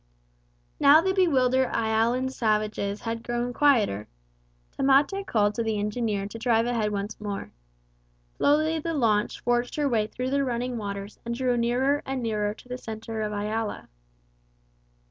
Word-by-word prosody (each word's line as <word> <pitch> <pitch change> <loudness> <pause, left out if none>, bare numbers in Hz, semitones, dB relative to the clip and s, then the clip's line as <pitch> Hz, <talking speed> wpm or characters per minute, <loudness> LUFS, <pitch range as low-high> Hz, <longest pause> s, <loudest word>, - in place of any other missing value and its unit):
Now 285 +3 +7
the 380 +3 +1
bewildered 260 -8 +3
Ialan 230 +4 +1
savages 215 -3 -1
had 230 0 -3
grown 240 +1 -2
quieter. 220 - +2 0.6
Tamate 285 +9 +2
called 205 -2 +2
to 230 - -2
the 220 -1 -1
engineer 210 -1 -1
to 225 - -8
drive 230 -1 +2
ahead 230 -3 0
once 205 +1 -4
more. 205 -1 -5 0.8
Slowly 310 +2 +2
the 330 +1 -3
launch 215 -6 +1
forged 240 0 0
her 295 -1 +1
way 220 -5 +1
through 255 +3 -4
the 280 0 +2
running 245 -1 -2
waters 200 0 -6
and 235 0 -3
drew 250 0 +1
nearer 250 +5 +1
and 265 -2 -3
nearer 210 -2 -1
to - - -17
the 250 0 -5
centre 220 0 -6
of 210 -1 -2
Iala. 210 +1 -3
235 Hz, 150 wpm, -26 LUFS, 215-260 Hz, 0.8 s, Now